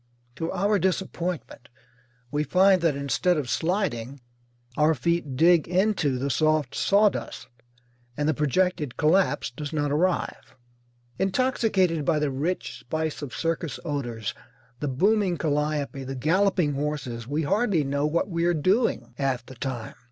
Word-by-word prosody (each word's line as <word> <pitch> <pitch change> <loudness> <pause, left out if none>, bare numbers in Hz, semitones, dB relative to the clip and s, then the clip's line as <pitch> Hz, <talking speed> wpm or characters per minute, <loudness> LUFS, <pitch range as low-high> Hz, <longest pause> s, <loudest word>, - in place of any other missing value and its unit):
To 165 0 -2
our 200 +2 +1
disappointment 180 -6 -3 0.6
we 150 +1 0
find 185 +4 +4
that 165 -4 +2
instead 140 +6 +1
of 145 -4 -2
sliding 150 - -1 0.6
our 155 +2 +3
feet 160 -1 -1
dig 165 +3 +4
into 180 -7 +1
the 140 +2 -1
soft 155 -3 +1
sawdust, 205 0 +1 0.7
and 145 0 0
the 155 - +3
projected 150 0 0
collapse 170 -1 +2
does 145 +3 -6
not 145 -2 -1
arrive. 175 +5 -1 0.6
Intoxicated 195 - +1
by 160 +1 +2
the 150 -2 0
rich 155 +8 -3
spice 155 -1 -3
of 140 -4 -6
circus 165 -1 -2
odours, 120 -8 -3 0.5
the 150 - -2
booming 190 +6 +2
calliope, 150 -2 -1
the 135 +1 -5
galloping 165 +3 +2
horses, 135 -5 -3
we 150 +4 -1
hardly 200 -1 +1
know 140 +2 0
what 165 +3 0
we 170 -3 -1
are 175 0 +2
doing 190 - +1
half 130 -4 -1
the 130 - -11
time. 125 -3 -5
155 Hz, 140 wpm, -26 LUFS, 140-180 Hz, 0.7 s, find